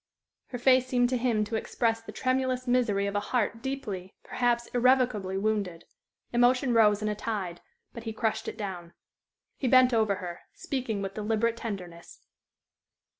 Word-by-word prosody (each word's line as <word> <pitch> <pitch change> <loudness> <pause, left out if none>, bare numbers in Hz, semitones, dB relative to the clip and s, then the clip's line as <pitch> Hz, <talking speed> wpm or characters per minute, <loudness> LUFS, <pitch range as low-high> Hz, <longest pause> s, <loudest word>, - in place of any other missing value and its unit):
Her 245 - -5
face 255 +1 +4
seemed 245 -1 +2
to 255 - 0
him 235 -3 +1
to 215 +2 -4
express 225 0 0
the 225 - -9
tremulous 255 0 0
misery 235 -6 +2
of 200 - -2
a 205 - +1
heart 230 +1 -1
deeply, 215 -9 -5
perhaps 240 -1 0
irrevocably, 245 -6 +2
wounded. 200 -5 -1 0.5
Emotion 245 +1 +3
rose 210 -2 +4
in - - 0
a 210 - 0
tide, 200 -5 -4 0.3
but 235 0 -9
he 225 - -3
crushed 220 0 -2
it - - -5
down. 180 -5 -6 0.6
He 265 - -1
bent 255 0 +6
over 215 -3 +2
her, 175 -2 -7 0.2
speaking 235 -7 -3
with 195 0 -4
deliberate 220 +2 0
tenderness. 180 -7 -8
225 Hz, 160 wpm, -28 LUFS, 200-250 Hz, 0.6 s, bent